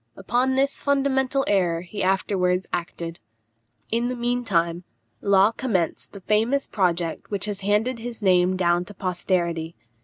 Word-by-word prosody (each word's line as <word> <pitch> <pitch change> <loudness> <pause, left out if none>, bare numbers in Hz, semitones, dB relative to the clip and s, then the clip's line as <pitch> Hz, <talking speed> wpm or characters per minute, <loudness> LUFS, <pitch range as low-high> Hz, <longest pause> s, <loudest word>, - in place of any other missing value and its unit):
Upon 245 +7 +1
this 275 +1 +1
fundamental 275 -1 +1
error 175 -5 +2
he 180 +4 -6
afterwards 185 -1 +1
acted. 170 0 -4 0.7
In 235 +2 +1
the 250 - -2
mean 245 +1 -1
time, 170 -4 0 0.4
Law 200 +1 +4
commenced 215 -9 -2
the 200 - -10
famous 225 +8 +1
project 175 -4 -1
which 200 -1 -1
has 205 -2 -3
handed 210 +5 +1
his 230 -1 -6
name 185 -1 +3
down 175 -1 +2
to 205 - -11
posterity. 175 -3 -1
195 Hz, 145 wpm, -24 LUFS, 180-240 Hz, 0.7 s, Law